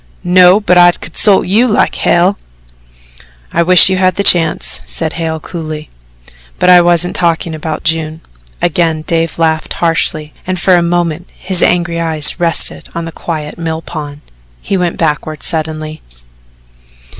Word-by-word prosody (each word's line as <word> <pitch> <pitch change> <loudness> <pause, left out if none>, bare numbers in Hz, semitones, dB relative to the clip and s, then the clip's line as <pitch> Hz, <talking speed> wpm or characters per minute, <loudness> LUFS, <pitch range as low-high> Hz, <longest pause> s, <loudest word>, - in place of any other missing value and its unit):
"No, 180 +2 +5
but 180 -4 +2
I'd 175 0 +4
consult 195 +5 +1
you 220 +7 +2
like 210 - +1
hell." 180 +4 +1 1.1
"I - - +1
wish 180 +1 +6
you 190 0 0
had 185 -1 +1
the 200 - -1
chance," 175 -4 +1
said 160 -2 -3
Hale 160 -1 -3
coolly; 155 -2 -7 0.7
"but 180 - +3
I 180 -1 +7
wasn't 175 +1 +1
talking 170 -2 -1
about 155 0 -5
June." 160 -1 -2 0.4
Again 165 -2 0
Dave 165 0 -1
laughed 160 -1 -1
harshly, 160 -2 -1
and 185 -1 -2
for 185 +1 +3
a 175 - +3
moment 170 0 -2
his 185 -1 +1
angry 170 -1 +1
eyes 160 -1 +3
rested 170 -1 -1
on 170 0 -4
the 165 - -7
quiet 155 -1 -6
mill 160 -1 -4
pond. 145 -3 -8 0.4
He 195 - -3
went 180 -2 -1
backward 155 -1 -2
suddenly. 155 -1 -3
170 Hz, 150 wpm, -12 LUFS, 160-180 Hz, 1.1 s, I